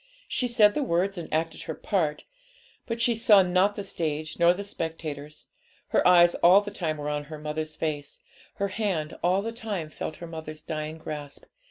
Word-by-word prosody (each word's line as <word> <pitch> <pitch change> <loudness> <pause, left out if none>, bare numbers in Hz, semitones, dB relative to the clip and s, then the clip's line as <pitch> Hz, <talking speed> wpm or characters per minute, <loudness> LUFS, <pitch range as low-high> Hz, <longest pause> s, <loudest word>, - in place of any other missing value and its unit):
She 250 - 0
said 220 -4 +5
the 300 - -1
words 195 -5 +1
and 170 - -8
acted 160 +1 -1
her 160 - -5
part, 160 -7 -1 0.6
but 230 0 -3
she 235 0 +3
saw 215 -3 +6
not 185 +3 +2
the 205 - -4
stage 155 -4 -3
nor 170 0 +6
the 190 +3 -3
spectators; 155 -5 -5 0.4
her - - +3
eyes 175 -1 +7
all 180 +3 +6
the 205 0 -7
time 155 -5 -2
were 145 0 -5
on 150 0 -2
her 155 +1 -8
mother's 155 +1 -4
face, 150 -3 -3 0.4
her 200 0 -1
hand 185 -7 -2
all 185 +3 +2
the 225 - -3
time 210 -9 -4
felt 155 - -5
her 170 - -8
mother's 155 -2 -8
dying 155 0 -4
grasp. 150 -2 -7
170 Hz, 190 wpm, -27 LUFS, 155-200 Hz, 0.6 s, eyes